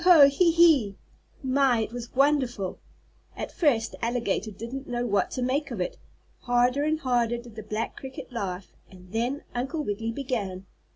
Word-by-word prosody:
Ho! 365 - +4
Ho! 280 - +10
He! 335 +5 +3
He!" 320 -12 +5 0.5
My, 260 -3 +3
it 220 - -3
was 240 0 -7
wonderful! 260 -9 +1 0.6
At - - -4
first 240 -9 +2
the - - -12
alligator 230 -3 0
didn't 235 +6 -7
know 240 0 -1
what 200 -5 +1
to 255 - -3
make 275 +4 0
of 235 -6 -5
it. 180 - -3 0.4
Harder 245 +3 +2
and 310 +1 +1
harder 240 -4 +1
did 235 -1 -11
the 220 - -6
black 215 +2 -4
cricket 265 -1 -8
laugh, 190 -5 -4 0.2
and 180 -1 -15
then 240 +6 -1
Uncle 270 +6 -2
Wiggily 225 0 -2
began. 225 -8 -3
245 Hz, 175 wpm, -27 LUFS, 220-275 Hz, 0.6 s, Ho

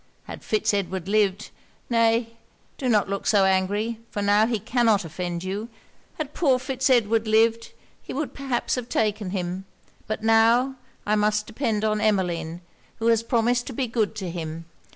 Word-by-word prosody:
Had - - -9
Fitz 215 -1 +1
Edward 190 -2 -2
lived 205 -1 +1 0.4
nay 230 0 +2 0.5
do 260 - -1
not 210 -4 +3
look 200 0 -3
so 200 -3 +4
angry, 205 +4 0
for 205 - -3
now 205 +2 +4
he 235 -2 0
cannot 225 -2 +1
offend 175 +1 -4
you 200 +5 -4 0.5
had 300 -2 -4
poor 275 -7 +3
Fitz 260 +1 -1
Edward 225 -3 +3
lived, 225 +1 +2 0.3
he - - -9
would 290 +2 -3
perhaps 265 -4 -2
have 250 -2 -3
taken 210 -2 0
him. 180 0 -3 0.4
But 215 0 -3
now, 230 +4 +4 0.3
I 210 - +2
must 210 0 +1
depend 220 -4 -1
on 215 -1 0
Emmeline, 175 -5 0 0.3
who 230 +1 0
has 230 -1 +4
promised 240 +1 +1
to 265 - -5
be 260 +3 -1
good 225 -2 -1
to 190 -5 -4
him. 165 -1 -6
215 Hz, 170 wpm, -24 LUFS, 195-235 Hz, 0.5 s, so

